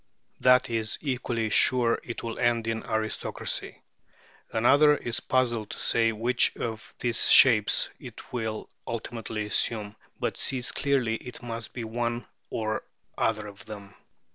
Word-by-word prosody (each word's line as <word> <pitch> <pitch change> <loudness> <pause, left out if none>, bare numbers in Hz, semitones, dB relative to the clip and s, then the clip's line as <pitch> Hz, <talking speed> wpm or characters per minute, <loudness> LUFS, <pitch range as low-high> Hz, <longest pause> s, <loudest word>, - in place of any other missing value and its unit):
That 125 0 +5
is 110 -1 -1
equally 120 -5 -2
sure 120 0 +4
it 120 - -6
will 115 -1 -5
end 120 -1 +2
in 115 0 -2
aristocracy. 110 0 -3 0.7
Another 145 +6 +5
is 120 - -2
puzzled 120 -4 0
to - - -7
say 115 -1 +2
which 120 +3 +1
of 110 -1 -5
these 120 -1 +2
shapes 110 -6 +6
it - - -12
will 110 -3 -3 0.2
ultimately 115 -1 -4
assume, 105 0 0 0.2
but - - -2
sees 130 -2 +1
clearly 130 -6 0
it 125 0 -10
must 115 -2 -5
be 120 - -4
one 120 +1 -2 0.2
or 110 -1 -2 0.3
other 110 -1 0
of 100 -1 -11
them. 100 -2 -9
115 Hz, 140 wpm, -27 LUFS, 110-120 Hz, 0.7 s, shapes